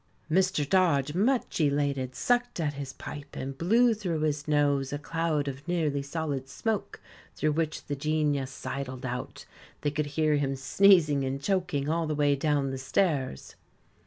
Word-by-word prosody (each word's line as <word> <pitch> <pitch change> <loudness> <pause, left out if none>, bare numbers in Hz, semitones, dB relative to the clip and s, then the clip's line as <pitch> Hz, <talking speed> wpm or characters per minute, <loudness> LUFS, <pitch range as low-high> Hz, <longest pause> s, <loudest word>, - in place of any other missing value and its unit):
Mr. 185 -4 +2
Dodge, 150 -6 +3
much 225 +1 +1
elated, 140 -3 0
sucked 245 -4 0
at 150 -3 0
his 140 -1 -6
pipe, 145 +1 -9
and 135 +1 -5
blew 230 - +4
through 180 -7 -2
his 150 -1 -1
nose 145 -2 +2
a 145 - -2
cloud 155 -1 -1
of 140 +3 -6
nearly 155 -5 0
solid 140 -2 -3
smoke, 220 +8 -3 0.4
through 155 +1 +1
which 155 0 -2
the 145 - -3
Genius 145 -2 0
sidled 130 -1 -5
out. 125 0 -5 0.4
They 145 - 0
could 150 0 -1
hear 150 0 +1
him 135 -1 0
sneezing 155 0 +4
and 135 +1 -2
choking 170 -5 -1
all 165 +1 0
the 155 - -1
way 145 -1 +3
down 140 -1 0
the 135 - -4
stairs. 135 - -1
145 Hz, 160 wpm, -28 LUFS, 140-165 Hz, 0.4 s, blew